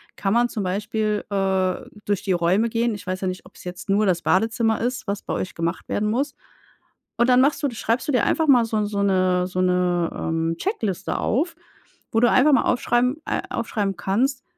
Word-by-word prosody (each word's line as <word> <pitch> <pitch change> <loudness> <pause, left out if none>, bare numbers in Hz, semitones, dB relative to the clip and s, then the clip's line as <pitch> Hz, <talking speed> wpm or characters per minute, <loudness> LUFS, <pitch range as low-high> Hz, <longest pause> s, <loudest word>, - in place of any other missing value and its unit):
kann 195 0 -1
man 240 +1 +3
zum 220 -4 -4
Beispiel, 210 +3 -1
äh, 190 -2 +1 0.3
durch 205 -2 -1
die 200 - -1
Räume 180 +6 +2
gehen. 230 +1 0
Ich 205 - -10
weiß 185 0 -3
ja 190 - -1
nicht, 185 0 -5
ob's 185 - -16
jetzt 180 +3 -8
nur 205 +2 +3
das 180 -3 +1
Badezimmer 225 +4 +1
ist, 245 0 -3
was 200 0 -2
bei - - -5
euch 185 - -3
gemacht 170 +2 -3
werden 210 +1 0
muss. 270 +5 -1 0.8
Und 240 - +3
dann 250 0 +6
machst 280 +3 +2
du 285 - +2
schreibst 230 +4 -1
du - - +1
dir 250 - +3
einfach 320 -1 +1
mal 250 -4 +6
so 225 -1 -2
'n 210 - +1
so 205 -1 -2
'ne 185 -2 +2
so 185 0 -4
'ne, 180 -2 +1
ähm, 165 0 -1
Checkliste 210 - -2
auf, 325 +9 0 0.6
wo 225 - +2
du 240 - +5
einfach 290 +3 +5
mal 270 - +4
aufschreiben 245 +2 +1
äh, - - -1
aufschreiben 205 -4 -2
kannst: 255 +7 0
210 Hz, 210 wpm, -23 LUFS, 185-240 Hz, 0.8 s, dann